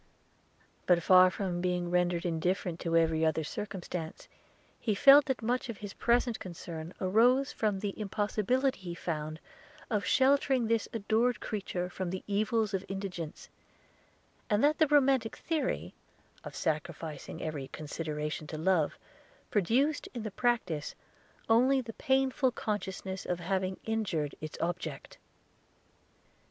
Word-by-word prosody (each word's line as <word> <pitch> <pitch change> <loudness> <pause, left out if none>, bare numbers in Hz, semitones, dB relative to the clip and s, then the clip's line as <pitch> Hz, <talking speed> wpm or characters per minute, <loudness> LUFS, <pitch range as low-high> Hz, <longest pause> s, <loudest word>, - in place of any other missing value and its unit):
But, 175 -2 +4
far 185 0 +7
from 180 -2 -3
being 180 -1 -1
rendered 175 0 +1
indifferent 175 +1 -1
to 165 -1 +1
every 160 -1 +2
other 160 0 +2
circumstance, 180 -3 -6 0.5
he 215 -4 0
felt 275 +6 +8
that 265 -5 -2
much 245 +2 -1
of 230 - -5
his 205 -1 -7
present 240 -1 +1
concern 170 -2 -7
arose 240 +8 +3
from 210 -3 0
the 200 0 -3
impossibility 215 +6 0
he 175 -2 -6
found 155 -2 -4 0.5
of 210 -2 +1
sheltering 265 -2 +3
this 225 -1 +1
adored 225 +3 +1
creature 190 -4 -3
from 180 0 -4
the 185 +1 -4
evils 215 +1 0
of 190 -1 -1
indigence; 190 -5 -5 1.0
and 210 +2 +2
that 300 +1 +3
the 315 - +5
romantic 270 -5 +3
theory, 320 -3 -2 0.5
of - - -8
sacrificing 155 -1 -3
every 150 -4 -4
consideration 150 0 -4
to 155 - -6
love, 165 -2 +1 0.5
produced, 250 - +1
in 235 - -4
the 215 - -4
practice, 190 -10 -1 0.5
only 255 +4 +4
the 235 -3 -6
painful 265 +1 +2
consciousness 190 -5 -4
of 180 -1 -2
having 185 +1 -1
injured 190 -10 -1
its 155 0 -6
object. 170 -4 -4
195 Hz, 130 wpm, -31 LUFS, 170-235 Hz, 1.0 s, felt